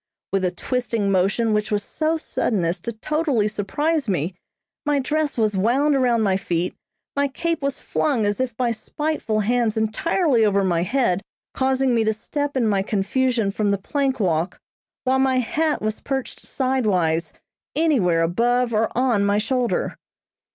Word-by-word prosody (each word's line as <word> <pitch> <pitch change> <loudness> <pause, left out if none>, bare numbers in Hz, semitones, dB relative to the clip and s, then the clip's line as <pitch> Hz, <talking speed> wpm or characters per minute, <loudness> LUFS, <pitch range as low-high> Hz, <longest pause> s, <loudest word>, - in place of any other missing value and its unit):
With 195 -1 +1
a 180 - +2
twisting 225 +1 -1
motion 200 +4 +2
which 210 0 0
was 205 -1 0
so 315 +6 -1
sudden 215 - -1
as 170 +2 -1
to 235 - -4
totally 265 -1 0
surprise 280 +7 -1
me, 175 -1 -1 0.5
my 295 -1 +1
dress 295 +1 -1
was 215 -3 +1
wound 260 +9 +2
around 245 -4 +2
my 190 -2 +2
feet, 175 -2 -2 0.4
my 280 0 +2
cape 330 +4 -2
was 275 -1 -2
flung 260 -8 0
as 205 +4 0
if 245 -3 -3
by 245 -2 +1
spiteful 230 -1 -2
hands 230 0 +1
entirely 235 - +2
over 200 -2 +3
my 175 -3 +1
head, 195 -2 +1 0.3
causing 265 -1 +1
me 230 -1 +3
to 220 0 +1
step 285 +6 -3
in 245 - +2
my 200 -3 +2
confusion 215 +2 0
from 210 0 0
the 200 - +2
plank 270 +6 -1
walk; 170 -3 0 0.5
while 260 0 +2
my 265 -1 +3
hat 300 +4 0
was 215 0 -1
perched 270 -2 -4
sidewise 200 - 0 0.4
anywhere 220 - +3
above 235 +7 +1
or 220 +1 +2
on 245 -5 +2
my 200 0 +2
shoulder. 245 +3 -1
230 Hz, 165 wpm, -22 LUFS, 200-270 Hz, 0.5 s, over